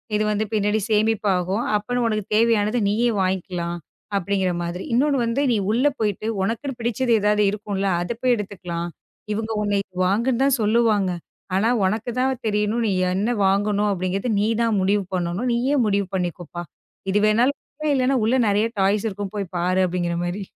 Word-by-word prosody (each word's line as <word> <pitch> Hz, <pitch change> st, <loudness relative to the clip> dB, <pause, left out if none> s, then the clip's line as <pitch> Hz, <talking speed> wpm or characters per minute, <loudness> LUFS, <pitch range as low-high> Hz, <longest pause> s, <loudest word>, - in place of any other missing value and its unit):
இது 215 Hz, -, +2 dB
வந்து 210 Hz, +1 st, 0 dB
பின்னாடி 210 Hz, 0 st, +1 dB
சேமிப்பு 215 Hz, 0 st, +2 dB
ஆகும். 190 Hz, +6 st, -1 dB
அப்ப 210 Hz, +4 st, -2 dB
உனக்குத் 215 Hz, -2 st, -2 dB
தேவையானது, 225 Hz, 0 st, +3 dB
நீயே 230 Hz, +4 st, +2 dB
வாங்கிக்கலாம் 180 Hz, -2 st, -2 dB, 0.4 s
அப்படிங்கற 190 Hz, 0 st, 0 dB
மாதிரி. 170 Hz, +2 st, -4 dB
இன்னொன்னு 280 Hz, +3 st, +3 dB
வந்து, 230 Hz, +4 st, 0 dB
நீ 230 Hz, -, +2 dB
உள்ள 240 Hz, +5 st, +1 dB
போயிட்டு 210 Hz, 0 st, -1 dB
உனக்கு 230 Hz, +8 st, -2 dB
பிடிச்சது 235 Hz, +1 st, -1 dB
ஏதாவது 210 Hz, 0 st, +3 dB
இருக்கும்ல. 200 Hz, -1 st, -3 dB
அத 175 Hz, +7 st, -3 dB
போய் 250 Hz, -1 st, +3 dB
எடுத்துக்கலாம். 180 Hz, -5 st, -5 dB, 0.5 s
இவங்க 220 Hz, +1 st, -3 dB
உன்னை 205 Hz, -1 st, +1 dB, 0.3 s
வாங்கனுதான் 250 Hz, +7 st, +2 dB
சொல்லுவாங்க. 210 Hz, -3 st, +2 dB, 0.4 s
ஆனா, 210 Hz, +4 st, +2 dB, 0.2 s
உனக்குத் 225 Hz, +5 st, -2 dB
தான் 260 Hz, -1 st, 0 dB
தெரியணும். 210 Hz, +2 st, 0 dB
நீ -, -, +1 dB, 0.2 s
என்ன 210 Hz, +5 st, 0 dB
வாங்கணும் 205 Hz, +2 st, +2 dB
அப்படிங்கறத 195 Hz, +4 st, -1 dB
நீ 210 Hz, -, +2 dB, 0.2 s
தான் 225 Hz, -3 st, +1 dB
முடிவு 200 Hz, +2 st, +2 dB
பண்ணனும். 180 Hz, +7 st, -1 dB
நீயே 255 Hz, +5 st, +1 dB
முடிவு 200 Hz, -2 st, +1 dB
பண்ணிக்கோப்பா. 175 Hz, -1 st, -4 dB, 0.5 s
இது 205 Hz, -, +2 dB
வேணும்னாலுமே 275 Hz, +6 st, 0 dB
இல்லன்னா, 260 Hz, 0 st, +2 dB
உள்ள 235 Hz, +4 st, +2 dB
நெறைய 210 Hz, +2 st, +2 dB
டாய்ஸ் 200 Hz, +3 st, +2 dB
இருக்கும். 200 Hz, 0 st, -6 dB
போய் 195 Hz, -4 st, -4 dB
பாரு 185 Hz, +2 st, +1 dB
அப்படிங்கற 175 Hz, -1 st, -2 dB
மாரி. 185 Hz, +3 st, -3 dB
210 Hz, 160 wpm, -22 LUFS, 190-230 Hz, 0.5 s, தேவையானது